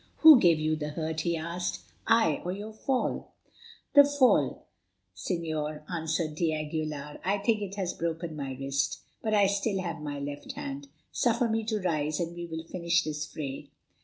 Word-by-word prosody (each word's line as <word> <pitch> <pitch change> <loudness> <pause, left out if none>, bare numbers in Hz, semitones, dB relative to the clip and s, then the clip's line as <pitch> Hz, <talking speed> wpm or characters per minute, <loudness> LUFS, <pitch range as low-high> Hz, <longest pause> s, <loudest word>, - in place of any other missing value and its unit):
"Who 310 -5 +11
gave 170 -6 +5
you 155 0 +1
the 150 -1 -4
hurt?" 160 +1 -3
he 170 0 0
asked, 170 +2 -3 0.3
"I 225 -10 +4
or 180 - -2
your 205 +3 -6
fall?" 255 +4 -2 0.6
"The 285 - +10
fall, 285 -3 +3 0.5
Señor," 155 -4 -3
answered 160 -1 -1
d'Aguilar; 155 -2 -2
"I 195 +3 +1
think 215 +2 +1
that 205 - -2
it 195 - -9
has 190 -3 -2
broken 165 -1 -3
my 135 -3 -4
wrist. 135 0 -1 0.2
But 215 -1 +1
I 205 - +5
have 200 0 +4
still 200 0 0 0.2
my 145 -1 -4
left 145 0 -6
hand. 140 +1 -6 0.2
Suffer 235 0 +2
me 225 0 0
to 220 0 -1
arise, 155 -6 -1
and 170 0 -3
we 175 0 -5
will 160 -1 -5
finish 170 0 +1
this 155 0 -3
fray." 140 -4 -6
165 Hz, 175 wpm, -29 LUFS, 155-200 Hz, 0.6 s, Who